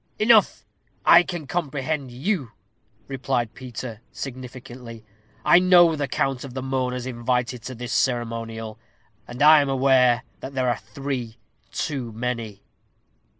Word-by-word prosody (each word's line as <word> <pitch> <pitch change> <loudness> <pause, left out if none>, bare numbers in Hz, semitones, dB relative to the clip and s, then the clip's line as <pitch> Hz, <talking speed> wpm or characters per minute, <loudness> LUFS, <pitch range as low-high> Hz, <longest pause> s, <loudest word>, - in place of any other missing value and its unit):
"Enough! 215 -1 +4 0.4
I 170 - +8
can 175 -3 -5
comprehend 145 -2 -2
you," 135 - -2 0.5
replied 130 -4 -2
Peter, 120 -3 -8
significantly; 125 -3 -9 0.4
"I 175 - +7
know 175 -3 +6
the 145 -2 -2
count 135 -2 -1
of 135 -2 -9
the 130 - -4
mourners 125 -2 -2
invited 125 0 -2
to 130 - -6
this 120 +1 -5
ceremonial, 115 -3 -2 0.5
and 125 +4 -2
I 155 0 +8
am 140 - -1
aware 130 -2 +3 0.2
that 135 - -8
there 130 -1 +1
are 120 - 0
three 130 -5 -5 0.3
too 130 -6 -3
many." 115 -3 -4
130 Hz, 130 wpm, -24 LUFS, 120-140 Hz, 0.5 s, I